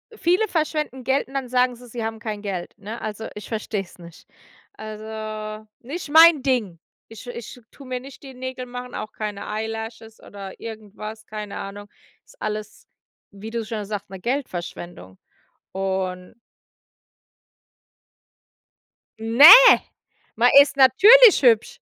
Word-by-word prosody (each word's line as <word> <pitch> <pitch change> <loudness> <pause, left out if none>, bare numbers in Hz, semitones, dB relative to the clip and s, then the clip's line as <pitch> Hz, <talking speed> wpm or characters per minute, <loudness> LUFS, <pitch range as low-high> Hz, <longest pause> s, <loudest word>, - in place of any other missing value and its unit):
viele 375 +3 +1
verschwenden 305 -6 -3
Geld 265 +3 0
und 270 - -16
dann 265 -2 -3
sagen 250 0 +1
sie, 245 +1 -15
sie 235 0 -6
haben 225 0 -5
kein 210 -2 -6
Geld, 190 -4 -5
ne? 215 +3 -8
Also, 215 +1 -6
ich 210 - -9
verstehe 215 -2 -3
es 185 - -15
nicht. 170 -1 -15 0.5
Also, 215 0 -8
nicht 290 +5 -8
mein 320 -1 +7
Ding. 235 -11 -1 0.3
Ich 225 +2 -13
ich 245 +1 -9
tue 275 -2 -14
mir 255 -1 -4
nicht 270 +2 -14
die 265 -1 -11
Nägel 255 0 -7
machen, 250 0 -9
auch 215 - -6
keine 210 -2 -6
eyelashes 225 +1 -6
oder 195 -1 -11
irgendwas, 215 0 -9
keine 210 -1 -7
Ahnung. 205 +1 -8 0.4
Ist - - -22
alles, 215 0 -6 0.4
wie 205 +3 -10
du 230 0 -3
schon 215 -2 -5
sagst, 205 -2 -6
'ne 190 -1 -9
Geldverschwendung. 175 - -6 0.6
Und 190 0 -4 2.9
Ne, 235 +9 +8 0.8
man 245 +2 +3
ist 280 -1 -1
natürlich 410 - +7
hübsch. 230 -3 +3
220 Hz, 135 wpm, -22 LUFS, 210-255 Hz, 2.9 s, Ne